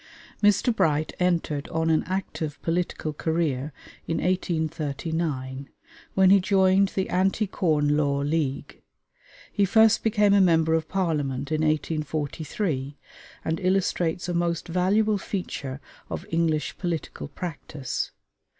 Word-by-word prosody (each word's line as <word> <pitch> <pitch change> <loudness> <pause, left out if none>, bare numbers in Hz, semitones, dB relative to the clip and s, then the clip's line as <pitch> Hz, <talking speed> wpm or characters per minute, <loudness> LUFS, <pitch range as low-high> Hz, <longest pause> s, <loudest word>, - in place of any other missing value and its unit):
Mr. 210 +3 +3
Bright 155 -4 +1
entered 170 -5 0
on 160 0 0
an 155 - +2
active 175 -5 -3
political 165 -2 -1
career 155 -3 -1 0.4
in 165 - -1
1839, 155 -5 -2 0.5
when 190 -1 +6
he 200 - +7
joined 190 0 +4
the 190 - 0
Anti 190 +4 +1
Corn 155 -7 +1
Law 140 -2 +1
League. 145 -2 -2 0.7
He 205 - +2
first 220 +3 +5
became 210 -2 +3
a 200 - +6
member 165 -3 +4
of 160 -1 0
Parliament 145 -7 -1
in 155 0 +1
1843, 155 - -2 0.5
and 160 +2 -1
illustrates 180 -3 0
a 175 - -2
most 170 0 -1
valuable 200 +5 +2
feature 145 -9 -4 0.3
of - - -5
English 160 -2 0
political 170 -5 -3
practice. 145 -3 -5
165 Hz, 120 wpm, -25 LUFS, 150-185 Hz, 0.7 s, he